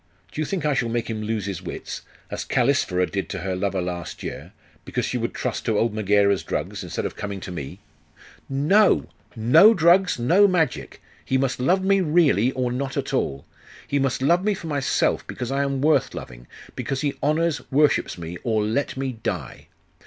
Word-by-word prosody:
Do 155 - -4
you - - 0
think 175 -1 -3
I 150 - +2
shall 120 -3 0
make 115 0 -2
him 110 -1 -4
lose 110 -2 -2
his 100 -4 -4
wits, - - -6 0.3
as - - -3
Callisphyra 120 -8 +1
did 95 +1 -4
to - - -4
her 95 -1 -2
lover 95 0 -1
last 90 -1 -5
year, - - -7 0.3
because - - -2
she - - -3
would - - -3
trust - - -3
to 110 - +1
old 115 +1 +1
Megaera's 100 -2 +2
drugs, - - -4
instead - - -4
of - - -4
coming 100 -2 -5
to 95 - -7
me!' 70 -6 -7 0.7
'No! 160 +10 +3 0.3
No 155 - +6
drugs; 175 +1 +4
no 175 +13 +5
magic! 165 -9 -1 0.2
He 130 - 0
must 130 -1 -1
love 185 +9 +2
me 195 0 +3
really, 150 - +3
or 125 -1 -1
not 135 +2 -3
at - - -3
all! 70 0 -1 0.4
He 140 - 0
must 135 -1 0
love 170 +6 +3
me 210 0 +1
for 185 - -9
myself, 145 -4 0
because 125 +1 -5
I 135 +1 +1
am 140 -1 -1
worth 155 +2 +2
loving, - - -9 0.3
because 135 -1 -3
he 145 -2 0
honours, 155 +1 +1
worships 145 -5 +2
me, 85 +1 -7
or 110 -3 +1
let 115 +7 -1
me 130 -4 -3
die. - - -4
130 Hz, 195 wpm, -23 LUFS, 105-155 Hz, 0.7 s, No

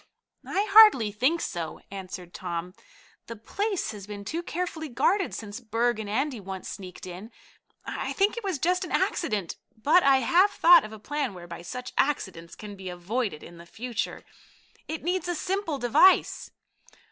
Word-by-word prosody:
"I 400 +2 0
hardly 410 - +8
think 260 +11 +1
so," 170 -3 -4
answered 185 -2 -8
Tom. 175 0 -5 0.5
"The 230 - -6
place 390 - -2
has 205 -2 -9
been 205 -1 -8
too 330 +8 -3
carefully 340 -2 -4
guarded 380 +10 +1
since 210 0 -7
Berg 235 0 0
and 210 -2 -5
Andy 260 +3 -1
once 190 -1 -7
sneaked 185 -3 -9
in. 185 +4 -8 0.6
I - - -4
think 405 +2 +2
it 470 - -6
was 380 -5 -1
just 360 +6 +1
an - - -7
accident, 210 - -1 0.2
but 300 +11 +4
I 275 -3 +5
have 360 - +4
thought 345 -3 +6
of 215 - -8
a 220 - -9
plan 275 0 -3
whereby 175 -1 -9
such 250 +8 -7
accidents 190 - -1
can 210 -1 -9
be 190 -1 -7
avoided 180 0 -3
in 170 - -12
the 170 - -13
future. 235 +3 -4 0.6
It 320 - -5
needs 355 +1 -1
a 350 - -1
simple 375 -3 -2
device." 265 +10 +4
235 Hz, 170 wpm, -27 LUFS, -, 0.6 s, hardly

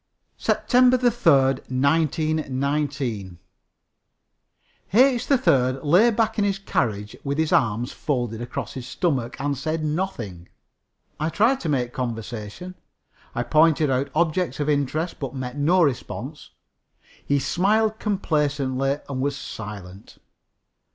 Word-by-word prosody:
SEPTEMBER 255 0 +3
3, 240 -1 +3 0.4
1919. 140 - 0 1.6
H. 250 +1 +4
3rd 135 - +2
lay 180 +11 +5
back 225 -1 0
in - - +3
his 200 -1 +1
carriage 105 - -2
with 140 0 -2
his 160 -1 +1
arms 115 -1 +1
folded 120 -6 -2
across 120 0 -5
his 130 -2 -7
stomach 130 -10 -2
and 140 +1 -1
said 155 +4 -3
nothing. 120 - -4 0.7
I 155 +1 0
tried 230 +10 +2
to 165 - -3
make 125 -4 -1
conversation. 115 - -5 0.6
I 120 - 0
pointed 155 +2 +3
out 130 +2 0
objects 170 +2 0
of 145 - -1
interest, 150 +3 -1
but 135 -2 -5
met 130 -1 -5
no 170 +5 +3
response. 140 +1 -3 0.7
He 140 - +1
smiled 215 +8 +1
complacently 145 - 0
and 130 -2 -3
was 140 +1 0
silent. 100 -3 -9
145 Hz, 115 wpm, -23 LUFS, 125-175 Hz, 1.6 s, lay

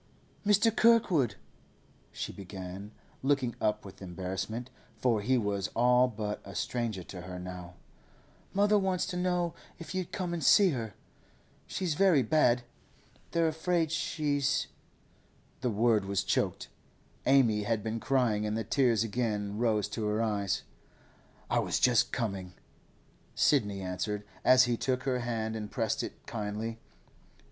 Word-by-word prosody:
'Mr. 210 +2 +4
Kirkwood,' 185 - +4 0.8
she - - -5
began, 95 +1 -8 0.3
looking 135 -3 +1
up 105 -1 0
with 95 - -12
embarrassment, 95 +6 -4 0.3
for 115 -4 +1
he 130 +5 +2
was 100 -4 -1
all 125 +1 +5
but 105 -3 -4
a 100 - -10
stranger 110 +1 -2
to 90 +1 -9
her 90 0 -7
now, 90 -1 -8 0.8
'mother 205 +1 +3
wants 190 -2 0
to 185 -1 -5
know 180 -1 0 0.2
if 170 - -8
you'd 185 -2 -3
come 180 -2 -3
and 165 -3 -3
see 195 +7 +6
her. 115 -6 -4 0.7
She's 180 -4 -1
very 165 -5 +4
bad; 125 -2 +3 0.7
they're 165 -1 +2
afraid 160 0 0
she's—' 145 -4 0 0.9
The 125 - 0
word 110 -1 +2
was 100 0 0
choked. - - 0 0.6
Amy 120 -6 +4
had 110 -1 0
been 110 +1 -2
crying, 120 -5 +1
and 105 +1 -1
the 115 - -1
tears 115 -1 +2
again 105 -2 -2
rose 110 -3 +2
to 105 0 -3
her 105 +1 0
eyes. 100 -3 -1 0.9
'I - - +3
was - - 0
just 125 -3 +4
coming,' 100 -6 -3 0.8
Sidney 105 -9 +2
answered, 95 +3 -3 0.2
as 130 0 +7
he 120 -1 +1
took 130 +1 -1
her 130 -2 0
hand 115 -2 -2
and 105 -1 -5
pressed - - -1
it - - -8
kindly. 110 +2 -4
115 Hz, 140 wpm, -30 LUFS, 105-145 Hz, 0.9 s, as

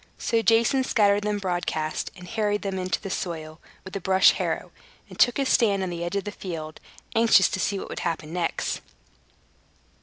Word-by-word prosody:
So 230 -2 +1
Jason 230 +4 +3
scattered 205 -5 +3
them 210 0 -1
broadcast, 175 -5 -2
and 180 0 -11
harrowed 210 0 -1
them 195 -1 -2
into 185 0 -1
the 195 - -6
soil 160 -3 -5 0.2
with 190 - -9
a - - -1
brush 190 +1 +5
harrow, - - -3 0.4
and - - -14
took 245 - +5
his 275 -1 0
stand 205 -7 +3
on 185 - -3
the 170 0 -4
edge 175 +3 -3
of 200 - 0
the 205 - -5
field, 160 -6 -7 0.3
anxious 225 -4 +5
to - - -3
see 200 +1 0
what - - -6
would - - -5
happen 165 -1 -3
next. 175 -2 -2
195 Hz, 190 wpm, -25 LUFS, 175-210 Hz, 0.4 s, brush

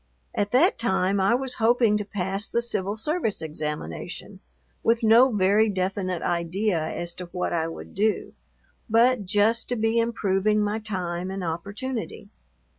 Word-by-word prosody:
At 205 - -1
that 305 +10 +3
time 195 -3 +1
I 195 +5 +3
was 260 0 -2
hoping 230 -1 +4
to 210 - -2
pass 195 +1 -1
the 235 - 0
Civil 205 -3 -1
Service 300 - -1
examination, 150 - -6 0.4
with 230 0 +1
no 235 +4 +6
very 205 +2 +3
definite 185 -2 -2
idea 175 +2 0
as 170 +2 -2
to 180 - -7
what 180 0 -3
I 165 -1 0
would 165 - -9
do, 210 +2 0 0.6
but 230 -1 +3
just 215 +3 +2
to 245 - 0
be 225 0 +1
improving 215 -2 +1
my 210 +1 0
time 185 -4 -4
and 190 0 -4
opportunity. 200 +6 -5
205 Hz, 150 wpm, -25 LUFS, 185-225 Hz, 0.6 s, no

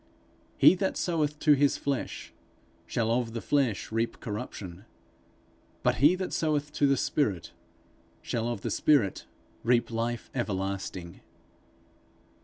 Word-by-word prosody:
'He - - +8
that 190 +1 -1
soweth 150 -4 0
to 150 - +6
his 140 0 +3
flesh, 140 -2 -3 0.5
shall 115 0 0
of 115 -1 0
the 115 - -3
flesh 125 -8 0
reap 115 +1 -1
corruption; 100 -3 -6 1.0
but - - +2
he 150 +6 +5
that 185 0 -4
soweth 150 -2 0
to 145 - +3
the 140 0 +3
spirit, 100 - 0 0.7
shall 115 0 -2
of 120 -4 -3
the - - -3
spirit 135 -11 +2 0.4
reap 120 0 +2
life 115 +1 -3
everlasting.' 95 -6 -3
120 Hz, 125 wpm, -28 LUFS, 105-145 Hz, 1.0 s, He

